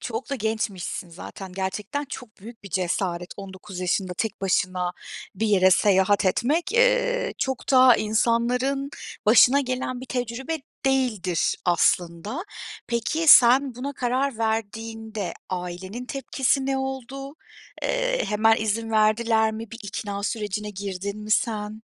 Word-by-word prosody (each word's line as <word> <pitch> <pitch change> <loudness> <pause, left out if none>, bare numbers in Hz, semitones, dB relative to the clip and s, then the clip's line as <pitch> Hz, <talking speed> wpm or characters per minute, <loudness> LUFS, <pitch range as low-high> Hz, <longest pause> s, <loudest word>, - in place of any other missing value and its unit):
Çok 245 +3 -5
da 275 - 0
gençmişsin 215 -6 -3
zaten, 185 +2 -9
gerçekten 200 +9 -3
çok 250 -5 -10
büyük 225 +2 -12
bir 200 - -10
cesaret. 180 0 -1
19 190 -1 -9
yaşında 185 0 0
tek 220 -3 -2
başına 185 -2 0 0.4
bir 220 +4 -1
yere 190 -3 +4
seyahat 200 +1 +3
etmek, 295 - +1
eee, - - +2
çok 265 0 -2
da 255 -2 +7
insanların 245 +5 +1 0.4
başına 245 +5 +7
gelen 255 -1 -3
bir 260 - -8
tecrübe 250 +5 -3 0.3
değildir 225 -10 +1
aslında. 175 - +1 0.4
Peki, 240 +8 -1
sen 255 0 +7
buna 270 +4 -5
karar 260 -1 -1
verdiğinde 220 -2 -3 0.2
ailenin 185 +6 -5
tepkisi 270 0 0
ne 270 0 0
oldu? 265 +1 -5 0.5
Eee, - - 0
hemen 220 +1 +3
izin 220 +1 -2
verdiler 220 +1 +3
mi? 220 0 -7
Bir 230 - -9
ikna 200 0 -5
sürecine 210 -1 -3
girdin 200 0 -5
mi 215 - -8
sen? 215 -2 0
225 Hz, 130 wpm, -24 LUFS, 200-260 Hz, 0.5 s, da